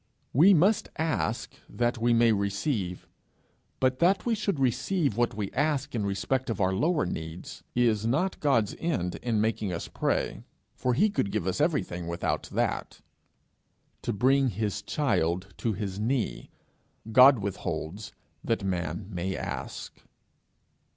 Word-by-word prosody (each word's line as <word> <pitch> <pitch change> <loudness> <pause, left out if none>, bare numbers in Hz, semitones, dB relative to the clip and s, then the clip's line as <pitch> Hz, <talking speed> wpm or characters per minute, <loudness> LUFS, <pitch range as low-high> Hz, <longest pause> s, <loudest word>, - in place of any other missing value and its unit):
We 180 +9 +7
must 190 +6 +3
ask 155 -8 -1 0.2
that 120 0 -1
we 120 +1 +2
may 115 0 +5
receive; 100 - -1 0.7
but 130 0 +1
that 185 +3 +3
we 235 - +2
should 200 -7 -1
receive 135 - +1
what 120 -1 +1
we 100 -2 -3
ask 145 -1 0
in 105 -4 -1
respect 125 +6 -1
of 110 - -2
our 95 -1 +2
lower 155 - +1
needs, 80 0 -6
is 115 -4 +2
not 150 +12 0
God's 115 -8 +2
end 95 - -1
in 115 -3 0
making 110 -2 0
us 85 - -4
pray, - - -1 0.3
for 125 -1 0
he 210 - +3
could 100 - 0
give 105 -5 -1
us 95 +9 -1
everything 140 - 0
without 85 0 -2
that: - - -2 1.0
to - - -2
bring 130 +6 +3
his 105 -3 -2
child 95 - 0
to 115 - -1
his 100 -1 -4
knee, 120 +3 -1 0.6
God 130 +3 +8
withholds 95 -1 -4 0.3
that 115 -3 -1
man 85 0 -2
may 95 +1 -3
ask. - - -6
115 Hz, 145 wpm, -28 LUFS, 95-140 Hz, 1.0 s, God